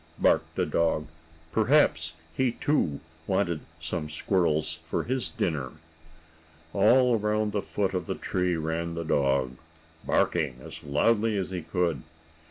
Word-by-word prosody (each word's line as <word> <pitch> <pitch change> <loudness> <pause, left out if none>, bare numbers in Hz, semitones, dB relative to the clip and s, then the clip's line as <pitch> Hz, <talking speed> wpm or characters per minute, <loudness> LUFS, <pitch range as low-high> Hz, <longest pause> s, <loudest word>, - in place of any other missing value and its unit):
Bow - - -31
wow!" - - +3
barked - - -6
the - - +1
dog. 80 -2 +1 0.4
Perhaps 110 - +3 0.2
he, 130 -3 +1
too, 85 - 0 0.3
wanted 90 -4 +1 0.2
some 80 -1 -4
squirrels 80 -1 0
for 80 - -2
his 130 0 -1
dinner. 70 -6 -2 1.0
All 120 +3 +5
around 105 0 0
the 105 - -1
foot 100 -1 -1
of 90 -3 -2
the - - -2
tree 90 -1 0
ran 80 +1 -2
the 85 0 -3
dog, 70 -4 +1 0.5
barking 60 - +1
as 65 - -10
loudly 105 +9 +2
as 95 -1 -2
he 90 -2 -3
could. 80 -3 -1
85 Hz, 145 wpm, -27 LUFS, 80-105 Hz, 1.0 s, All